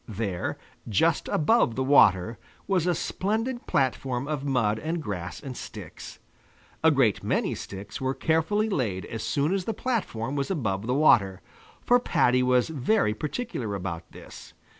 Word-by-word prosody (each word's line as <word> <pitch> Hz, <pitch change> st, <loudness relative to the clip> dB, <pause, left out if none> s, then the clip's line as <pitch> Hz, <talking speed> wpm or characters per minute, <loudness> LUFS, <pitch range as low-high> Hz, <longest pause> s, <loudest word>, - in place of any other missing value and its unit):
There, 100 Hz, -4 st, -3 dB, 0.3 s
just 160 Hz, -, +2 dB
above 155 Hz, -, +2 dB
the 130 Hz, -, 0 dB
water, 110 Hz, -6 st, +4 dB, 0.3 s
was 185 Hz, -3 st, +1 dB
a 175 Hz, -, +2 dB
splendid 225 Hz, +10 st, -2 dB
platform 130 Hz, 0 st, 0 dB
of 150 Hz, -3 st, -3 dB
mud 115 Hz, -6 st, +1 dB
and 165 Hz, +5 st, -2 dB
grass 100 Hz, -, -5 dB
and 135 Hz, -3 st, -7 dB
sticks. -, -, -9 dB, 0.7 s
A 160 Hz, -, +7 dB
great 135 Hz, -9 st, +2 dB
many -, -, 0 dB
sticks 100 Hz, +5 st, -8 dB
were 130 Hz, 0 st, -1 dB
carefully 165 Hz, +7 st, +1 dB
laid 110 Hz, -, -2 dB
as 115 Hz, -, -6 dB
soon 145 Hz, -, 0 dB
as 195 Hz, -2 st, -1 dB
the 225 Hz, -, -2 dB
platform 160 Hz, -, -2 dB
was 140 Hz, -1 st, -1 dB
above 110 Hz, -, -2 dB
the 125 Hz, -, +1 dB
water, 100 Hz, -11 st, +4 dB, 0.5 s
for 245 Hz, 0 st, +5 dB
Paddy 125 Hz, -, +2 dB
was 125 Hz, -1 st, +3 dB
very 150 Hz, -, +1 dB
particular 145 Hz, -, -4 dB
about 90 Hz, -3 st, -5 dB
this. -, -, -12 dB
135 Hz, 155 wpm, -26 LUFS, 110-165 Hz, 0.7 s, A